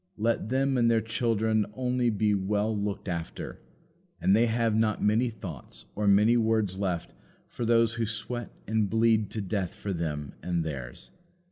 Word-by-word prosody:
Let 110 Hz, 0 st, 0 dB
them 135 Hz, 0 st, +1 dB
and 115 Hz, -1 st, +4 dB
their 115 Hz, -1 st, +4 dB
children 110 Hz, -2 st, +1 dB
only 125 Hz, -1 st, +1 dB
be 105 Hz, -1 st, +1 dB
well 105 Hz, +2 st, 0 dB
looked 100 Hz, -1 st, -3 dB
after, 85 Hz, -3 st, -5 dB, 0.6 s
and 95 Hz, -, +4 dB
they 115 Hz, +2 st, +4 dB
have 115 Hz, -1 st, +1 dB
not 110 Hz, -1 st, +1 dB
many 110 Hz, +4 st, +3 dB
thoughts 90 Hz, -, -9 dB
or 105 Hz, 0 st, -1 dB
many 105 Hz, +4 st, +5 dB
words 110 Hz, -4 st, +1 dB
left 90 Hz, -4 st, -2 dB, 0.3 s
for 120 Hz, -, -5 dB
those 115 Hz, 0 st, +3 dB
who 115 Hz, -1 st, -1 dB
sweat 110 Hz, +2 st, -4 dB, 0.2 s
and 110 Hz, -1 st, +1 dB
bleed 110 Hz, -1 st, +3 dB
to 110 Hz, -, -4 dB
death 95 Hz, -2 st, -2 dB
for 100 Hz, -, -4 dB
them 75 Hz, -4 st, -3 dB
and 85 Hz, -2 st, -1 dB
theirs. 65 Hz, -6 st, -7 dB
110 Hz, 165 wpm, -28 LUFS, 100-115 Hz, 0.6 s, many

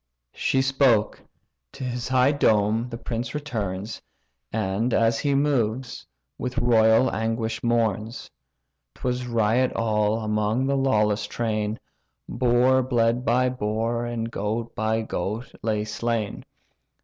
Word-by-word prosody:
She 130 Hz, -, +1 dB
spoke: 135 Hz, -5 st, +2 dB, 0.5 s
to 135 Hz, -, -8 dB
his 125 Hz, -1 st, -3 dB
high 130 Hz, +1 st, +4 dB
dome 110 Hz, -3 st, +2 dB
the 115 Hz, -, -6 dB
prince 120 Hz, +1 st, -4 dB
returns, 110 Hz, -8 st, -4 dB, 0.5 s
And, 110 Hz, +3 st, 0 dB
as 115 Hz, 0 st, +2 dB
he 140 Hz, -2 st, +1 dB
moves, 130 Hz, -4 st, 0 dB, 0.3 s
with 125 Hz, 0 st, -4 dB
royal 115 Hz, +1 st, +4 dB
anguish 115 Hz, 0 st, -2 dB
mourns. 115 Hz, -1 st, -1 dB, 0.6 s
'Twas 125 Hz, 0 st, -2 dB
riot 115 Hz, +2 st, +2 dB
all, 110 Hz, -1 st, +1 dB
among 105 Hz, +4 st, 0 dB
the 140 Hz, +1 st, +1 dB
lawless 105 Hz, -6 st, +1 dB
train; 110 Hz, -2 st, -2 dB, 0.5 s
Boar 125 Hz, +1 st, +3 dB
bled 120 Hz, -1 st, +1 dB
by 125 Hz, +1 st, +2 dB
boar, 115 Hz, 0 st, -1 dB
and 115 Hz, -1 st, -3 dB
goat 110 Hz, +2 st, -3 dB
by 110 Hz, +1 st, 0 dB
goat 110 Hz, +4 st, -4 dB
lay 110 Hz, -2 st, 0 dB
slain. 110 Hz, -1 st, -3 dB
115 Hz, 120 wpm, -24 LUFS, 110-125 Hz, 0.6 s, high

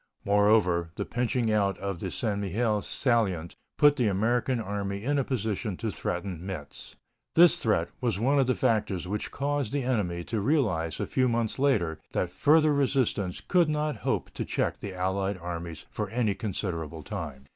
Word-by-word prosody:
Moreover, 100 Hz, -4 st, +3 dB
the -, -, -3 dB
pinching 120 Hz, -1 st, 0 dB
out 100 Hz, -3 st, +2 dB
of 100 Hz, -3 st, -4 dB
the 95 Hz, -, -3 dB
St. 105 Hz, 0 st, -1 dB
Mihiel 105 Hz, +2 st, 0 dB
salient 100 Hz, -, 0 dB, 0.2 s
put 145 Hz, 0 st, +5 dB
the 120 Hz, -4 st, +2 dB
American 115 Hz, +5 st, +1 dB
Army 100 Hz, -1 st, -3 dB
in 145 Hz, +3 st, +1 dB
a -, -, +2 dB
position 110 Hz, -5 st, -2 dB
to 115 Hz, -2 st, -2 dB
threaten 90 Hz, -2 st, -4 dB
Metz. 90 Hz, -7 st, -7 dB, 0.4 s
This 170 Hz, +1 st, +7 dB
threat 95 Hz, -7 st, +1 dB
was 120 Hz, -6 st, 0 dB
one 135 Hz, +7 st, +2 dB
of 135 Hz, -, +3 dB
the 130 Hz, -, +2 dB
factors 95 Hz, -3 st, 0 dB
which 105 Hz, +2 st, -3 dB
caused 140 Hz, -4 st, -1 dB
the 140 Hz, -2 st, -1 dB
enemy 100 Hz, -9 st, -1 dB
to 110 Hz, +3 st, -2 dB
realize 95 Hz, -, +1 dB
a -, -, -1 dB
few 130 Hz, -1 st, +1 dB
months 115 Hz, 0 st, -1 dB
later 95 Hz, -, +1 dB
that -, -, -1 dB
further 155 Hz, 0 st, +4 dB
resistance 130 Hz, -9 st, 0 dB
could 175 Hz, -4 st, +4 dB
not 150 Hz, 0 st, -1 dB
hope -, -, -2 dB
to -, -, -4 dB
check -, -, -1 dB
the 100 Hz, -2 st, -6 dB
allied 95 Hz, +2 st, -1 dB
armies 85 Hz, -2 st, -6 dB
for 105 Hz, -2 st, -3 dB
any 115 Hz, -2 st, +1 dB
considerable 85 Hz, -6 st, -4 dB
time. 70 Hz, -4 st, -6 dB
105 Hz, 175 wpm, -28 LUFS, 90-125 Hz, 0.4 s, This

